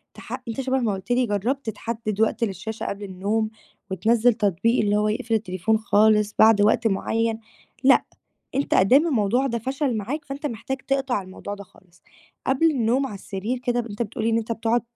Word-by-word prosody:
تح 250 Hz, +2 st, -7 dB
أنت 230 Hz, +4 st, -3 dB
شبه 265 Hz, 0 st, 0 dB
ما 225 Hz, -5 st, 0 dB
قُلت 195 Hz, +4 st, -6 dB
لي 245 Hz, 0 st, +2 dB
جرّبت 225 Hz, +5 st, -1 dB
تحدّد 220 Hz, -1 st, -4 dB
وقت 225 Hz, +1 st, +1 dB
للشاشة 215 Hz, +2 st, -5 dB
قبل 200 Hz, +1 st, -4 dB
النوم، 200 Hz, +4 st, -1 dB, 0.4 s
وتنزّل 230 Hz, +4 st, +3 dB
تطبيق 215 Hz, +2 st, +1 dB
اللي 205 Hz, 0 st, +2 dB
هو 210 Hz, 0 st, +2 dB
يقفل 225 Hz, +2 st, -2 dB
التليفون 215 Hz, +1 st, 0 dB
خالص 215 Hz, -1 st, +3 dB
بعد 220 Hz, -1 st, +6 dB
وقت 220 Hz, +2 st, +3 dB
معيّن، 225 Hz, +2 st, 0 dB, 0.4 s
لأ 265 Hz, 0 st, +5 dB, 0.5 s
أنت 275 Hz, -, 0 dB
أدام 265 Hz, -, +5 dB
الموضوع 245 Hz, -1 st, +1 dB
ده 235 Hz, -2 st, -1 dB
فَشَل 265 Hz, +1 st, -1 dB
معاك 275 Hz, +9 st, -4 dB
فأنت 280 Hz, +1 st, -6 dB
محتاج 265 Hz, +2 st, -4 dB
تِقطَع 270 Hz, -5 st, 0 dB
الموضوع 190 Hz, +2 st, -8 dB
ده 200 Hz, -, -10 dB
خالص، 180 Hz, -1 st, -24 dB, 0.4 s
قبل 315 Hz, +5 st, +3 dB
النوم 255 Hz, 0 st, +1 dB
على 210 Hz, -, -7 dB
السرير 200 Hz, +5 st, -4 dB
كده 245 Hz, -1 st, 0 dB
ب 235 Hz, -, -8 dB
أنت 205 Hz, +1 st, -6 dB
بتقول 225 Hz, +1 st, -5 dB
لي -, -, +3 dB
إن 225 Hz, -, +3 dB
أنت 230 Hz, 0 st, -3 dB
بتقعد 230 Hz, +1 st, +1 dB
225 Hz, 190 wpm, -24 LUFS, 205-250 Hz, 0.5 s, بعد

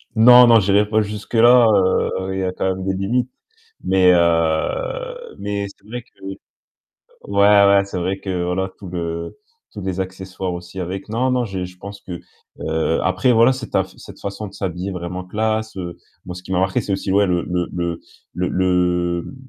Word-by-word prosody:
Non 125 Hz, +2 st, +8 dB
non, 115 Hz, -1 st, +6 dB
j'irai 100 Hz, +1 st, +2 dB
pas 110 Hz, 0 st, +2 dB
jusque 105 Hz, +1 st, -6 dB
là, 120 Hz, +1 st, +6 dB
heu, 95 Hz, -1 st, +1 dB
il 95 Hz, -, -2 dB
y -, -, -1 dB
a 90 Hz, -, -1 dB
quand 90 Hz, -, -4 dB
même 95 Hz, -, -6 dB
des 95 Hz, -, 0 dB
limites, 120 Hz, +7 st, -1 dB, 0.5 s
mais 95 Hz, -1 st, +4 dB
heu, 450 Hz, -, 0 dB
mais 100 Hz, 0 st, -3 dB
c'est 100 Hz, -, -30 dB
vrai 120 Hz, +1 st, -6 dB
que -, -, -32 dB
ouais, 95 Hz, 0 st, -7 dB, 1.3 s
ouais, 100 Hz, 0 st, +5 dB
c'est 100 Hz, -, -6 dB
vrai 95 Hz, +2 st, -2 dB
que 90 Hz, -3 st, -3 dB
voilà 95 Hz, +2 st, -1 dB
tout 100 Hz, -, -10 dB
le 85 Hz, -1 st, -5 dB, 0.4 s
tous 105 Hz, -, -7 dB
les 95 Hz, 0 st, -3 dB
accessoires 95 Hz, -1 st, -5 dB
aussi 90 Hz, +2 st, -8 dB
avec, 95 Hz, +3 st, -5 dB
non, 125 Hz, +4 st, 0 dB
non, 125 Hz, -1 st, +1 dB
j'ai 95 Hz, -4 st, -4 dB
je 90 Hz, 0 st, -12 dB
pense 100 Hz, +2 st, -9 dB
que, 90 Hz, -4 st, -8 dB, 0.4 s
heu, 80 Hz, +1 st, 0 dB
après 125 Hz, -2 st, +2 dB
voilà, 115 Hz, +3 st, +5 dB
cette 130 Hz, -2 st, -6 dB
af -, -, 0 dB
cette -, -, -13 dB
façon 100 Hz, +2 st, -5 dB
de 95 Hz, -, -14 dB
s'habiller 95 Hz, 0 st, -4 dB
vraiment 90 Hz, 0 st, -5 dB
classe, 110 Hz, +3 st, -2 dB
heu, 85 Hz, -2 st, -6 dB, 0.3 s
moi 90 Hz, -, -7 dB
ce 90 Hz, -, -9 dB
qui 95 Hz, -, -5 dB
m'a 90 Hz, -, +2 dB
marqué, 95 Hz, +5 st, +1 dB
c'est 105 Hz, -3 st, -2 dB
aussi 95 Hz, 0 st, -2 dB
ouais 100 Hz, +1 st, +4 dB
le 90 Hz, -2 st, 0 dB
le 90 Hz, -1 st, -2 dB
le 85 Hz, -1 st, -3 dB, 0.3 s
le -, -, -9 dB
le 90 Hz, +2 st, 0 dB
95 Hz, 195 wpm, -20 LUFS, 90-110 Hz, 1.3 s, Non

